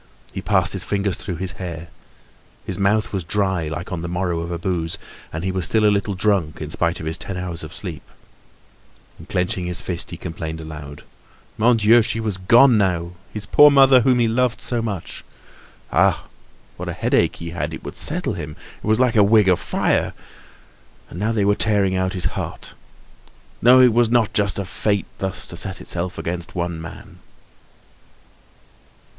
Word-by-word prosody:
He - - -4
passed - - +2
his - - -2
fingers 100 -2 -1
through 90 - -5
his 90 +2 -4
hair. 85 -2 -6 0.8
His 95 - -4
mouth 105 +3 +1
was 95 -3 -2
dry, 95 -2 0
like 80 +4 -5
on 90 -2 -3
the 85 - -4
morrow 90 -1 -1
of 85 +1 -4
a 85 - -3
booze, 85 -2 -2 0.3
and 80 +2 -5
he 95 - -1
was 90 -2 -1
still 110 -1 +2
a 105 - +5
little 100 0 -1
drunk 95 -6 0
in 75 -1 -6
spite 85 +1 0
of - - -6
his 80 +1 -3
ten 95 - -5
hours 90 -2 -5
of 80 - -8
sleep. - - -7 1.2
And, - - -13
clenching 90 0 -1
his 90 0 -1
fist, 85 -2 -1
he 85 - -7
complained 80 -2 -6
aloud. 75 -2 -9 0.5
Mon 115 +2 +3
Dieu! 115 +2 +6
she 115 +1 -2
was 110 -4 -2
gone 115 +5 +6
now, 90 -3 0 0.2
his 105 -1 -5
poor 150 +7 +7
mother, 135 -2 +6
whom 130 0 +3
he 120 -1 +3
loved 125 +1 +1
so 120 -2 -1
much! 105 -6 -5 0.7
Ah! - - +3 0.5
what - - -5
a - - -3
headache - - +1
he 85 0 -7
had; 85 - -3
it - - -8
would - - -7
settle - - -1
him! 75 +1 -6 0.3
It - - -5
was 110 +2 +3
like 125 -2 +3
a 105 - +6
wig 105 0 +5
of 90 -2 +4
fire! - - 0 1.0
And 85 - -7
now 110 +3 0
they 105 -3 +1
were 100 - +4
tearing 100 -3 +2
out 95 0 0
his 90 -2 -2
heart! - - -6 0.9
No, 125 +2 +7
it 125 -3 +6
was 120 0 +3
not 115 -3 +2
just 100 -2 +1
of 100 -2 -3
fate 100 0 0
thus 95 -1 -4
to - - -8
set 95 0 -5
itself 90 +1 -3
against 85 +1 -5
one 85 -2 -3
man! 85 - -11
95 Hz, 190 wpm, -21 LUFS, 85-110 Hz, 1.2 s, poor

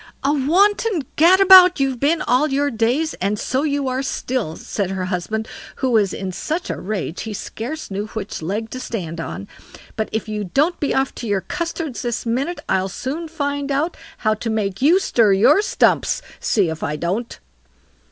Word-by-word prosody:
"A 280 +2 +2
wanton 375 - +2
gadabout 370 +1 +7
you've 265 -2 0
been 310 +5 +1
all 255 +5 +2
your 285 0 0
days, 245 +8 0
and 200 +2 0
so 260 +5 -1
you 285 -2 -1
are 260 +1 -1
still", 250 -9 -3
said 195 +1 -3
her 190 -1 -3
husband, 205 +4 -3 0.3
who 260 -2 -1
was 210 -5 +3
in 190 -1 -4
such 315 - -3
a - - -5
rage 190 -4 -4
he 220 -2 -5
scarce 250 +7 -6
knew 200 +2 -3
which 215 -5 -6
leg 210 +7 -3
to 255 - -5
stand 170 -10 -5
on; 100 -10 -6 0.5
"but 220 - -2
if 220 0 -3
you 210 -1 -3
don't 295 - +1
be 290 - 0
off 265 0 +1
to 235 - -6
your 200 -2 0
custards 330 - -4
this 240 -1 -3
minute, 265 +9 -1
I'll 190 0 +1
soon 290 - -4
find 285 -2 -3
out 300 +5 0 0.2
how 215 -2 +1
to 225 +2 -4
make 205 -2 -2
you 330 +8 +5
stir 230 - +3
your 270 - +5
stumps; - - +1 0.2
see 195 -6 +1
if 160 - -6
I 150 - -2
don't." 185 +9 -3
245 Hz, 185 wpm, -20 LUFS, 205-295 Hz, 0.5 s, gadabout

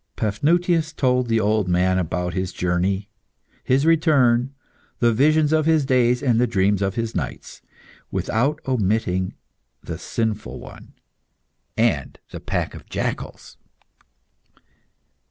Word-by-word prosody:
Paphnutius 160 - +1
told 125 -3 +1
the 115 -1 +2
old 105 -2 +1
man 90 +1 +2
about 90 0 -2
his 95 0 -2
journey, 90 +3 -1 0.6
his 135 +3 +2
return, 140 -7 +3 0.5
the 120 -1 +3
visions 150 +5 +3
of 155 0 +2
his 160 -3 +3
days 125 -1 +2
and 120 -4 +2
the 125 - +3
dreams 100 -2 +1
of 100 0 -1
his 115 -1 -2
nights, - - -5 0.5
without 140 +7 0
omitting 100 -6 0 0.5
the - - -6
sinful 110 -2 -3
one - - -13 0.8
and 110 - 0
the - - -7
pack - - -3
of - - -12
jackals. - - -5
115 Hz, 120 wpm, -22 LUFS, 95-140 Hz, 0.8 s, return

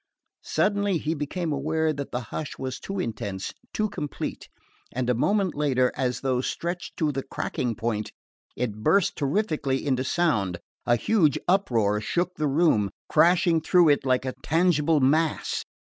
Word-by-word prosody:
Suddenly 205 -2 +1
he 155 0 -1
became 160 +2 -3
aware 155 +3 0
that 140 -1 -6
the 125 - -2
hush 155 - -4
was 130 -1 -4
too 195 0 -5
intense, 100 - -4 0.2
too 215 - 0
complete; 150 -8 -5 0.4
and 125 0 -2
a 125 - +3
moment 195 - +1
later, 130 -4 +2
as 125 -2 -1
though 130 -2 +1
stretched 175 +6 -4
to 155 -3 +1
the 135 -1 -3
cracking 125 -3 -3
point, 110 -2 -2 0.4
it 110 -4 -3
burst 195 - +3
terrifically 145 -4 -1
into 130 -2 +1
sound. 120 - +1 0.3
A 120 - +5
huge 155 - +2
uproar 115 - +2
shook 175 +10 -1
the 155 -4 -1
room, 135 - +3 0.2
crashing 175 -1 +4
through 175 0 +5
it 145 - +3
like 130 -1 +1
a 130 - -2
tangible 160 0 +2
mass. 155 +4 +1
145 Hz, 155 wpm, -26 LUFS, 125-170 Hz, 0.4 s, A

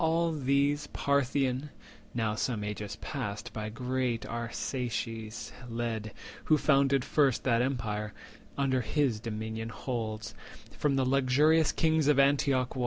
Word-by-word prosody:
All 165 +1 +2
these 140 0 +1
the - - -10
Parthian 140 0 +1 0.5
(now 110 -3 +1
some 110 0 -1
ages 105 0 -4
past 100 0 -4
By 110 -1 -4
great 125 0 -1
Arsaces 115 -1 -4 0.2
led, 115 -2 -3 0.3
who 155 - +5
founded 140 -2 +3
first 140 -5 +2
That 120 -2 +3
empire) 110 -5 -2 0.5
under 130 -2 +2
his 120 0 +1
dominion 110 0 -4
holds, 110 -2 -4 0.4
From 145 -2 +1
the 135 -1 +2
luxurious 140 +4 +4
kings 160 -2 +2
of 150 -2 +5
Antioch 140 -2 +3
won. - - -3
130 Hz, 130 wpm, -30 LUFS, 110-140 Hz, 0.5 s, who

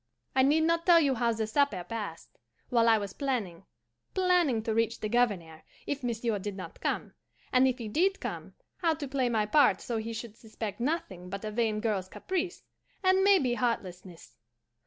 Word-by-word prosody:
"I 260 - +5
need 290 +4 +4
not 335 +1 +1
tell 345 -1 +8
you 280 -4 +3
how 235 -1 +1
the 220 -1 -1
supper 220 -5 +1
passed, 200 -3 -7 0.3
while 230 -1 +4
I 225 - +6
was 200 -2 -5
planning 230 -12 -3 0.5
planning 355 - +2
to 225 - -1
reach 225 +1 0
the 215 - -2
Governor 200 -9 0 0.2
if 285 -1 -3
monsieur 230 -3 -1
did 205 0 -5
not 185 - -9
come; - - -2 0.4
and 255 +1 +5
if 255 -1 0
he 230 -4 -6
did 370 - +1
come, - - -6 0.2
how 330 -3 +1
to 295 -2 -5
play 260 -2 0
my 220 -3 +1
part 280 +6 +4
so 235 - -3
he 220 +1 -4
should 225 -1 -7
suspect 220 -2 -6
nothing 235 - -3
but 200 +2 -5
a 215 - -3
vain 215 -1 0
girl's 205 -5 -1
caprice, 370 - -3 0.4
and 375 0 +4
maybe 375 -12 +4
heartlessness. 185 - -4
230 Hz, 185 wpm, -29 LUFS, 210-285 Hz, 0.5 s, tell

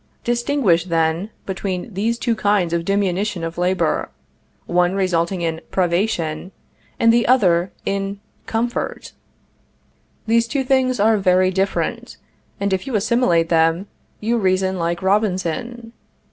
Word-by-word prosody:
Distinguish, 240 - +1
then, 165 +2 0 0.2
between 190 +1 -4
these 225 +5 -1
two 235 -1 0
kinds 200 -5 +1
of 170 -1 -1
diminution 195 -1 0
of 165 +1 -5
labor, 185 +1 0 0.6
one 175 +1 +1
resulting 180 -1 0
in 165 -1 -2
privation, 175 -2 -1 0.5
and 230 0 +5
the 235 0 +2
other 185 -8 +3
in 195 0 -2 0.3
comfort. 235 +2 -3 1.1
These 230 +1 +2
two 275 +2 -1
things 255 -2 +1
are 220 +1 +4
very 185 -1 +3
different, 195 +1 -2 0.4
and 200 -1 0
if 190 +8 -2
you 260 - -2
assimilate 200 -6 +2
them, 165 +2 +2 0.3
you 230 +2 0
reason 190 -1 +1
like 170 +1 -2
Robinson. 210 +4 -1
195 Hz, 125 wpm, -20 LUFS, 175-225 Hz, 1.1 s, and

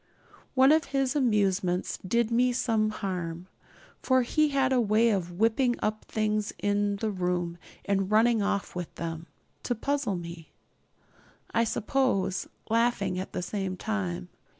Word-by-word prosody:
One 265 +2 +6
of 315 0 +4
his 270 0 0
amusements 200 -8 +1
did 235 +4 0
me 245 +1 +3
some 225 -3 +1
harm; 180 -5 -4 0.6
for 260 -1 +3
he 305 +5 +2
had 270 -2 +2
a 250 - +4
way 225 +1 +3
of 180 -4 -1
whipping 230 +6 +2
up 215 0 -2
things 215 -1 -1
in 205 0 +1
the 215 +2 -2
room 180 -2 -2 0.3
and 195 -1 0
running 225 +1 +4
off 200 -1 -1
with 180 -2 -5
them 165 0 -5 0.3
to 245 - -1
puzzle 275 -3 -1
me, 170 -2 -8 1.0
I 230 - +3
suppose, 210 -5 0 0.2
laughing 225 -5 +1
all 185 - -4
the 180 - -3 0.3
time. 90 - -3
210 Hz, 140 wpm, -28 LUFS, 180-240 Hz, 1.0 s, One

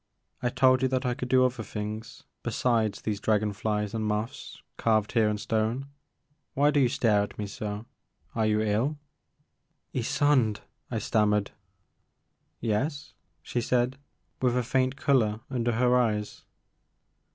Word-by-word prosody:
I 120 - +1
told 130 0 +4
you 130 - +3
that 130 0 -1
I 125 - +1
could 125 - -5
do 130 0 +5
other 125 -2 -1
things 110 +1 -6 0.2
besides 115 -2 0
these 105 -2 -2
dragon 105 -1 +1
flies 105 0 -2
and 110 -1 -2
moths 110 +5 -3
carved 110 -2 +1
here 110 -3 +3
in 105 - -1
stone. 110 +5 -1 0.7
Why 145 +2 +4
do 145 - +2
you 130 -3 +4
stare 115 -6 +3
at 105 - -5
me 105 - -3
so? 105 +1 -5 0.5
Are 110 -1 +1
you 105 0 +2
ill? 110 +8 0 0.5
*' - - -49
Ysonde," 125 -3 +2 0.3
I - - -2
stammered. 105 -2 +1 1.1
Yes," 140 +7 -2 0.3
she 120 - -2
said, 125 +2 +1 0.4
with 125 -1 +2
a 125 - +1
faint 130 +2 +1
color 115 -7 +2
tmder 120 -3 0
her 125 +1 +3
eyes. 105 -4 0
115 Hz, 150 wpm, -28 LUFS, 105-130 Hz, 1.1 s, do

